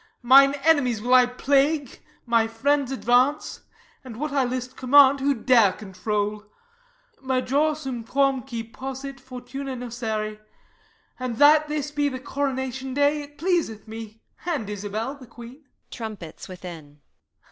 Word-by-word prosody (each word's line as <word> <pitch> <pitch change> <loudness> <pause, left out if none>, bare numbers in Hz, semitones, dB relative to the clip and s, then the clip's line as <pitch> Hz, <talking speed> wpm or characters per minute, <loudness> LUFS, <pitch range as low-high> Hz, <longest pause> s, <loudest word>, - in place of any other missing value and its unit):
Mine 275 +3 +7
enemies 285 -8 +3
will 245 +4 0
I 250 -1 +7
plague, 280 +2 0 0.3
my 230 -2 +2
friends 270 +4 0
advance; 255 +2 +1 0.4
And 245 -3 -10
what 300 +1 -3
I 280 -1 +2
list 255 +1 -4
command 275 +1 +5
who 280 +1 +1
dare 230 -4 +4
control? 210 +2 -3 0.8
Major 270 +4 +1
sum 265 -6 -5
quàm 270 +2 +1
cui 230 -2 -4
possit 270 +3 -7
fortuna 260 +1 -7
nocere: 220 -3 -4 0.8
And 250 -3 -4
that 300 +2 +6
this 300 -1 -3
be 290 -1 0
the 260 -1 -6
coronation 265 -1 -3
day, 290 +1 +2
It 290 0 -13
pleaseth 330 - -1
me 220 0 -9 0.2
and 305 - -2
Isabel 210 +5 -4
the 275 -3 -14
queen. 240 +5 -13 0.3
[_Trumpets 210 -8 -8
within. 165 -6 -10
255 Hz, 135 wpm, -24 LUFS, 225-280 Hz, 0.8 s, Mine